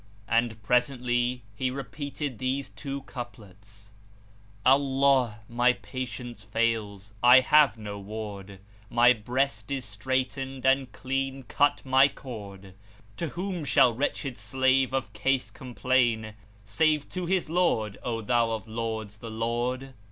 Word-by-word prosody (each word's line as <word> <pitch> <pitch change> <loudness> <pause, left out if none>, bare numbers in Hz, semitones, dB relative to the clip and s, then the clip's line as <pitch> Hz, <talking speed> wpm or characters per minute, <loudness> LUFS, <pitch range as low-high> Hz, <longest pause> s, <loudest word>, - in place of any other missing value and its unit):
And 115 -2 0
presently 125 0 +1
he 130 +4 -1
repeated 140 +1 -5
these 130 +2 -1
two 140 -1 -6
couplets, 105 -4 -10 0.7
"Allah, 135 -4 +3
my 120 +1 +3
patience 120 -3 -6
fails: 105 -2 -1
I 125 +2 +8
have 150 -1 +5
no 105 -2 -6
ward; 100 -2 -7 0.2
* 105 0 -27
My 120 +1 +8
breast 120 -1 -2
is 135 -3 -2
straitened 130 +4 -3
and 135 -1 +3
clean 135 0 -3
cut 145 +5 +1
my 130 +1 +6
cord; 100 -8 -9 0.4
To 170 - -2
whom 180 +1 -4
shall 125 -3 +4
wretched 135 -1 -2
slave 130 +5 +2
of 130 -5 -2
case 130 +5 0
complain 120 -4 0 0.2
* 105 0 -28
Save 150 +8 +1
to 180 -2 -4
his 185 -2 +1
Lord? 155 - +1
O 115 -2 -3
thou 115 0 +2
of 110 -1 -5
lords 110 -2 -4
the 115 +1 -8
Lord!" 120 +4 -2
125 Hz, 130 wpm, -27 LUFS, 110-135 Hz, 0.7 s, I